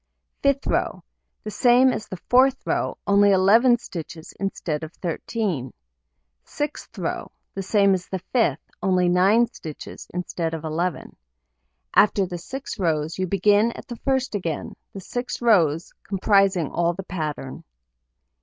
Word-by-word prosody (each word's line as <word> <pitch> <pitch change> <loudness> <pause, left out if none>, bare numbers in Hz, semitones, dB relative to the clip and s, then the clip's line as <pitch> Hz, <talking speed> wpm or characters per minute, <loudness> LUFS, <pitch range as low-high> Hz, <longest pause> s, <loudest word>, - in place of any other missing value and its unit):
Fifth 280 0 +2
row: - - -1 0.4
The 215 - -5
same 250 +3 +4
as 215 - -5
the 185 - -6
fourth 260 +7 +3
row, - - -1
only 200 0 +5
11 220 +6 +5
stitches 170 -7 -8
instead 170 -6 -3
of 160 - -6
13. 175 - -3 0.7
Sixth 295 0 -5
row: - - -3 0.2
The 195 - -4
same 200 0 +3
as 180 -1 -2
the 190 - -3
fifth, 185 - 0
only 185 -2 +2
9 195 +7 +4
stitches 155 -2 -9
instead 170 -2 -3
of 160 - -7
11. 160 +2 -3 0.8
After 200 -1 +4
the 175 -1 -6
6 265 +6 -7
rows, 160 -2 -1
you 185 - 0
begin 205 +4 +3
at - - -11
the 240 - -7
first 265 -1 -1
again, 170 -7 -3 0.2
the 195 - -8
6 245 +6 -4
rows 175 -9 +2
comprising 195 -5 +2
all 170 0 +1
the 195 +3 -7
pattern. 155 -7 -5
190 Hz, 145 wpm, -23 LUFS, 170-225 Hz, 0.8 s, only